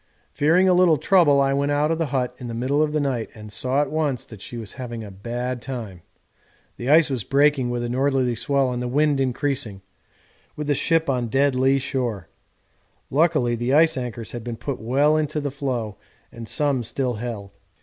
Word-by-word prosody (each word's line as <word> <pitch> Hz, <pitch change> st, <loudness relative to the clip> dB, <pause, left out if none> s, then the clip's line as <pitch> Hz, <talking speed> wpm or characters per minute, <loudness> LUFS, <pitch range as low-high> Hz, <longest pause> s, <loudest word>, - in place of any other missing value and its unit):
Fearing 165 Hz, +6 st, +3 dB
a 185 Hz, -, +5 dB
little 180 Hz, -3 st, +5 dB
trouble 155 Hz, -4 st, +4 dB
I 135 Hz, 0 st, +2 dB
went 140 Hz, +1 st, 0 dB
out 145 Hz, +2 st, +1 dB
of 165 Hz, -, -1 dB
the 165 Hz, -, 0 dB
hut 125 Hz, -3 st, -1 dB
in 125 Hz, -, -7 dB
the 115 Hz, -, -5 dB
middle 135 Hz, +5 st, 0 dB
of 155 Hz, -1 st, +1 dB
the 155 Hz, -, 0 dB
night 130 Hz, -6 st, -1 dB
and 105 Hz, -1 st, -10 dB
saw 130 Hz, +6 st, +1 dB
at -, -, -6 dB
once 150 Hz, -6 st, -1 dB
that 110 Hz, -4 st, -12 dB
she 120 Hz, -, -7 dB
was 110 Hz, -3 st, -7 dB
having 120 Hz, -3 st, -6 dB
a 105 Hz, -, -9 dB
bad 120 Hz, +5 st, -4 dB
time 115 Hz, -9 st, -6 dB, 0.8 s
the 120 Hz, -, -4 dB
ice 155 Hz, 0 st, +5 dB
was 125 Hz, -5 st, -2 dB
breaking 140 Hz, 0 st, +2 dB
with 120 Hz, 0 st, -2 dB
a -, -, -2 dB
northerly 130 Hz, -1 st, +1 dB
swell 135 Hz, +2 st, 0 dB
and 125 Hz, 0 st, -3 dB
the 125 Hz, -, -2 dB
wind 145 Hz, +2 st, +2 dB
increasing, 125 Hz, -6 st, -2 dB, 0.7 s
with 150 Hz, -, -4 dB
the 145 Hz, -, +2 dB
ship 165 Hz, +3 st, +1 dB
on 125 Hz, -3 st, 0 dB
dead 135 Hz, +4 st, +2 dB
lee 130 Hz, +2 st, +3 dB
shore; 120 Hz, -9 st, -3 dB, 0.8 s
luckily 150 Hz, -5 st, +2 dB
the 120 Hz, +3 st, 0 dB
ice 160 Hz, +1 st, +5 dB
anchors 120 Hz, -3 st, -5 dB
had 120 Hz, -2 st, -6 dB
been 120 Hz, -1 st, -5 dB
put 125 Hz, +3 st, -4 dB
well 140 Hz, +7 st, +2 dB
in 155 Hz, -1 st, +1 dB
on 150 Hz, -, -1 dB
the 145 Hz, -, -2 dB
floe 125 Hz, -7 st, -3 dB, 0.3 s
and 115 Hz, -1 st, -9 dB
some 145 Hz, -2 st, 0 dB
still 125 Hz, +2 st, -2 dB
held. 105 Hz, -4 st, -6 dB
130 Hz, 210 wpm, -23 LUFS, 120-145 Hz, 0.8 s, a